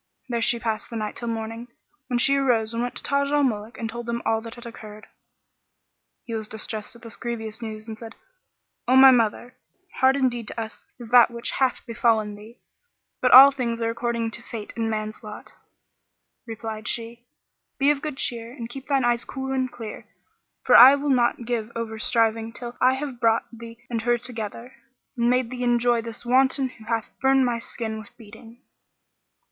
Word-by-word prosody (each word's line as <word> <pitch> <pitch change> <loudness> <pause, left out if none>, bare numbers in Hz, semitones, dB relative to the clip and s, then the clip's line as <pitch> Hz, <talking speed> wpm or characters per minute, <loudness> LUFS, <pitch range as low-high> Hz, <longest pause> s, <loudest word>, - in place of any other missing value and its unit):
There 235 -1 -1
she 235 - +2
passed 225 -2 -3
the 230 - -8
night 215 -2 -3
till 235 - -5
morning, 225 +1 -4 0.4
when 245 - 0
she 275 +3 +3
arose 235 -5 +1
and 230 - -2
went 245 0 -3
to - - -3
Taj 280 0 +1
al 290 0 +2
Muluk 220 -3 -2
and 230 - -3
told 235 +1 -7
them 235 0 -3
all 225 0 +1
that 230 +1 -9
had 240 0 -12
occurred. 215 -2 -10 1.2
He 230 - -6
was 220 -1 -3
distressed 220 0 -5
at 235 - -17
this 230 - -7
grievous 225 -2 -5
news 215 -1 -7
and 220 - -6
said, 225 0 -10 0.7
"O 255 - +4
my 265 0 +9
mother, 240 +1 0 0.4
hard 265 +1 +4
indeed 245 -4 0
to - - -5
us 220 0 -7
is 240 -2 -10
that 245 -1 +7
which 235 0 -5
hath 260 -2 0
befallen 225 -2 +1
thee, 215 +3 -14 0.6
but 250 - +3
all 270 +2 +11
things 240 -4 -3
are 230 0 0
according 235 -1 -2
to - - -5
fate 215 -3 -8
and 225 -1 -1
man's 215 0 -4
lot." 210 -1 -10 0.9
Replied 220 -1 -6
she, 235 +1 -3 0.5
"Be 280 +1 +4
of 285 -1 -2
good 300 -3 -5
cheer 235 -2 -2
and 240 -3 -7
keep 270 +2 -9
thine 275 -3 +2
eyes 240 -1 +1
cool 265 0 -5
and 260 -1 -1
clear, 230 -3 -9 0.6
for 250 - +5
I 260 +4 +10
will 285 0 -1
not 240 -2 +1
give 230 -2 -2
over 225 -1 -4
striving 225 0 0
till 240 0 -8
I 255 +1 +4
have 265 -3 -6
brought 230 -2 +2
thee 230 0 -10
and 230 -2 -3
her 240 +1 +2
together, 235 0 -7 0.4
and 235 -1 +1
made 250 -1 +1
thee 250 -1 -4
enjoy 240 -1 +2
this 230 +1 -8
wanton 260 +2 +3
who 220 -3 -16
hath 225 -1 -2
burnt 265 0 +4
my 240 -1 -1
skin 220 -1 -5
with 215 - -13
beating." 225 +2 -15
235 Hz, 195 wpm, -24 LUFS, 225-250 Hz, 1.2 s, all